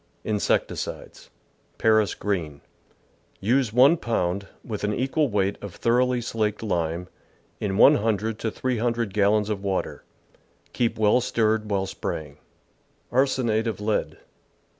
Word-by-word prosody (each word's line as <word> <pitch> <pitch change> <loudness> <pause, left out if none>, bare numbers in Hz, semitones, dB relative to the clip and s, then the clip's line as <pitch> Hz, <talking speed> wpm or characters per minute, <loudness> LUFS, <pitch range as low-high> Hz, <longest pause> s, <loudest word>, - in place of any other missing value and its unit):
Insecticides 105 -2 -2 0.5
Paris 110 -2 +3
Green. 85 -8 -3 0.4
— - - -38
Use 130 -2 +3
1 135 +8 +6
pound, 100 - -1 0.2
with 105 -3 -5
an 105 0 0
equal 135 +4 +1
weight 100 -1 0
of 100 -3 -8
thoroughly 125 +1 +2
slaked 110 -2 -2
lime, 85 -3 -2 0.5
in 100 -2 -2
100 110 -4 +3
to 115 - -1
300 115 -3 -1
gallons 105 0 +2
of 100 -2 -3
water. 95 -1 -2 0.7
Keep 120 -2 0
well 110 +3 +4
stirred 110 -2 0
while 100 -2 0
spraying. 75 -6 -5 0.7
Arsenate 120 -4 +1
of 110 - -3
Lead. 105 +1 -1
110 Hz, 120 wpm, -25 LUFS, 100-120 Hz, 0.7 s, 1